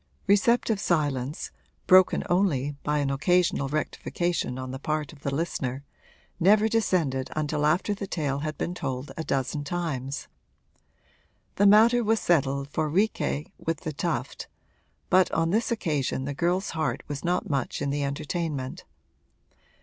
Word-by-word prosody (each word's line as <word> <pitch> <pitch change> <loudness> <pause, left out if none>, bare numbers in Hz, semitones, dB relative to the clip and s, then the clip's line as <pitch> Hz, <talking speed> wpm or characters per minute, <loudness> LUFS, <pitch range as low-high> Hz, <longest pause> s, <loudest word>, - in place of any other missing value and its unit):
Receptive 215 +1 +3
silence, 145 -6 -1 0.3
broken 185 0 +5
only 145 -7 +1
by 150 0 0
an 140 -2 0
occasional 155 0 +2
rectification 155 -1 -2
on 130 0 -5
the 130 - -6
part 155 +1 -2
of 150 - -15
the 140 - -2
listener, 140 -3 -2 0.6
never 210 +5 +5
descended 170 -12 0
until 150 -1 0
after 180 +6 +1
the 200 -1 -5
tale 145 -6 -2
had 155 +1 -4
been 175 - -2
told 135 -5 -4
a 160 - -4
dozen 135 0 -1
times. 140 -5 -3 1.3
The 205 - +5
matter 230 +4 +6
was 225 +1 +2
settled 140 -6 +1
for 155 +1 -1
'Riquet 180 -4 0
with 165 -2 -3
the 155 - -4
Tuft,' - - -3 0.6
but 185 -1 +5
on 165 0 +1
this 225 +4 +1
occasion 150 - -1
the 145 - -3
girl's 175 +6 0
heart 160 -1 -2
was 145 -2 -5
not 175 +1 0
much 140 -4 -2
in 140 -1 -1
the 145 0 -1
entertainment. 140 -1 -3
155 Hz, 145 wpm, -26 LUFS, 140-180 Hz, 1.3 s, matter